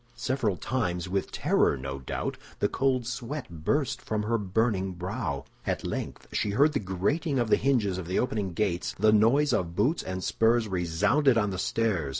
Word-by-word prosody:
Several 120 -8 -1
times, 90 -9 -2
with 95 +1 -2
terror, - - +2
no 70 +1 -5
doubt, 65 - -3 0.2
the - - +2
cold 130 -2 0
sweat 125 +4 -4 0.2
burst 140 - 0
from 105 -1 -2
her 115 +2 0
burning 100 -1 0
brow. 90 - -4 0.2
At - - -2
length - - -4
she - - 0
heard 145 +9 +3
the 140 - +1
grating 105 - -1
of 120 -3 0
the - - +8
hinges 110 -9 +1
of 85 - -6
the 90 - -1
opening 105 -7 -1
gates; 90 -2 -1
the 110 0 +4
noise 125 +7 +4
of 85 -5 -1
boots 130 - +2
and 95 0 -5
spurs 115 0 +2
resounded 105 - +2
on 105 -3 +1
the 95 - -4
stairs. 95 -8 0
105 Hz, 180 wpm, -28 LUFS, 90-125 Hz, 0.2 s, the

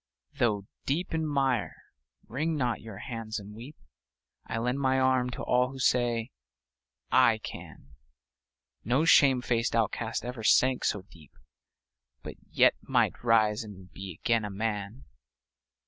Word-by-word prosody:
Though 105 -5 0 0.2
deep 165 +6 -1
in 160 -1 0
mire, 135 -5 0 0.5
wring 155 +8 -2
not 125 -5 -1
your 110 -3 -9
hands 115 -2 -5
and 105 0 -9
weep; 125 +8 -10 0.7
I - - -3
lend 125 +4 -1
my 130 -1 +2
arm 130 -1 +2
to 125 - -6
all 125 0 +2
who 135 - -9
say 120 -3 +1 0.8
"I - - +5
can!" 70 - -10 0.9
No 130 +8 +1
shame 135 -6 +5
faced 115 -1 0
outcast 115 +1 -1
ever 120 -2 -6
sank 130 +3 +3
so 100 - 0
deep, 80 -7 -19 0.9
But - - -7 0.2
yet - - +5
might - - 0
rise 110 -2 +3
and 95 -4 -12
be 95 -3 -8
again 115 -3 +1
a 105 - -4
man 105 +3 -4
120 Hz, 140 wpm, -28 LUFS, 110-130 Hz, 0.9 s, I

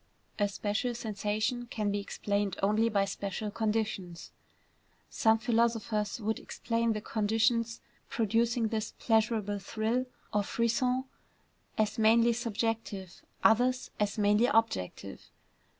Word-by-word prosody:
A 205 - +3
special 210 +4 -2
sensation 215 +2 -2
can 210 -3 -1
be 205 - 0
explained 200 -1 -2
only 215 +3 +3
by 200 -2 +2
special 200 +2 -4
conditions. 210 -6 -2 0.8
Some 220 0 +4
philosophers 225 -2 0
would 220 0 -1
explain 230 -1 -1
the 215 - -4
conditions 225 +2 +1 0.3
producing 230 +1 +1
this 220 -1 -3
pleasurable 215 -2 +1
thrill, 225 +5 -1 0.3
or 210 - +3
frisson, 235 +4 +1 0.7
as 215 0 0
mainly 230 +2 +5
subjective; 225 -5 -3 0.2
others, 250 +3 +3
as 210 0 0
mainly 210 +3 +4
objective. 225 - -1
220 Hz, 110 wpm, -30 LUFS, 205-230 Hz, 0.8 s, mainly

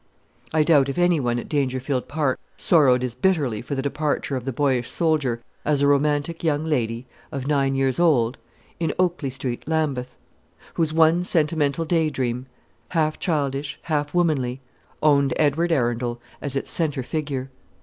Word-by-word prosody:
I 155 -1 +3
doubt 145 -4 +4
if 135 - -4
any 175 -2 +3
one 120 -3 0
at 120 - -5
Dangerfield 130 -2 -1
Park 145 -3 0 0.2
sorrowed 130 -7 +4
as 125 -2 -2
bitterly 130 - +1
for 135 +4 -4
the 135 - -2
departure 145 -1 -1
of 130 -2 -4
the 135 - -1
boyish 130 -2 0
soldier 145 -8 0 0.2
as 145 -1 +1
a - - +5
romantic 145 +3 +1
young 155 -1 +1
lady, 120 -6 -1 0.3
of 135 -4 -4
nine 135 -2 +1
years 135 +2 +1
old, 135 -8 +3 0.4
in 165 -2 0
Oakley 175 -6 0
Street, 130 -2 -4
Lambeth; 145 -6 -1 0.6
whose 160 -2 0
one 165 +2 +4
sentimental 160 -2 +1
day 160 -1 +2
dream 125 -2 -3 0.4
half 155 -3 0
childish, 140 -4 -1
half 145 -2 -1
womanly 145 -8 +1 0.4
owned 140 -3 +4
Edward 160 +3 +2
Arundel 120 -4 0 0.2
as 140 -1 -4
its 135 - -1
centre 145 -6 +1
figure. 135 -2 -3
145 Hz, 160 wpm, -23 LUFS, 130-155 Hz, 0.6 s, a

